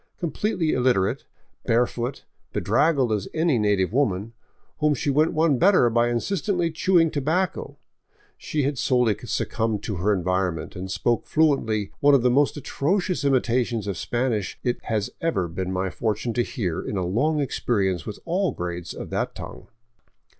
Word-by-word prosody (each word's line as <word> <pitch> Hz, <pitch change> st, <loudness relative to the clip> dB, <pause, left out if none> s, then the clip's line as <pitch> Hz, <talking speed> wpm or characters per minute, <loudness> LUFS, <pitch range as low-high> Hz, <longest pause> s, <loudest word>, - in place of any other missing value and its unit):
Completely 170 Hz, -1 st, -1 dB
illiterate, 125 Hz, -7 st, +1 dB, 0.4 s
barefoot, 120 Hz, +2 st, 0 dB, 0.3 s
bedraggled 140 Hz, -7 st, +2 dB
as 105 Hz, -3 st, -1 dB
any 160 Hz, -6 st, +2 dB
native 100 Hz, -2 st, +1 dB
woman, 115 Hz, -5 st, 0 dB, 0.5 s
whom 150 Hz, -1 st, +3 dB
she 140 Hz, +2 st, -1 dB
went 155 Hz, +4 st, +3 dB
one 155 Hz, -4 st, +2 dB
better 180 Hz, -, +5 dB
by 120 Hz, +1 st, +2 dB
incessantly 175 Hz, -, -1 dB
chewing 165 Hz, 0 st, +3 dB
tobacco, 160 Hz, +6 st, -1 dB, 0.6 s
she 150 Hz, -2 st, -2 dB
had 140 Hz, -1 st, -1 dB
wholly 125 Hz, -5 st, +2 dB
succumbed 110 Hz, +1 st, -2 dB
to 105 Hz, -5 st, -3 dB
her 100 Hz, +5 st, +1 dB
environment, 90 Hz, -2 st, -1 dB
and 95 Hz, +1 st, -6 dB
spoke 120 Hz, +5 st, 0 dB
fluently 115 Hz, -10 st, +1 dB
one 145 Hz, 0 st, +5 dB
of 130 Hz, -, +2 dB
the 125 Hz, -, +4 dB
most 145 Hz, +3 st, +2 dB
atrocious 175 Hz, +5 st, -1 dB
imitations 120 Hz, -4 st, +1 dB
of 100 Hz, -2 st, -2 dB
Spanish 120 Hz, -5 st, -2 dB
it 125 Hz, -1 st, -1 dB
has 110 Hz, -3 st, -1 dB
ever 160 Hz, -, 0 dB
been 90 Hz, +3 st, -4 dB
my 95 Hz, 0 st, -1 dB
fortune 110 Hz, +1 st, -2 dB
to 120 Hz, -, +1 dB
hear 90 Hz, -8 st, -2 dB
in 105 Hz, -, -4 dB
a 90 Hz, -, -1 dB
long 145 Hz, -, +1 dB
experience 100 Hz, -, 0 dB
with 105 Hz, -, -6 dB
all 180 Hz, +2 st, 0 dB
grades 85 Hz, -1 st, -5 dB
of -, -, -7 dB
that -, -, -2 dB
tongue. -, -, -9 dB
120 Hz, 155 wpm, -24 LUFS, 100-150 Hz, 0.6 s, better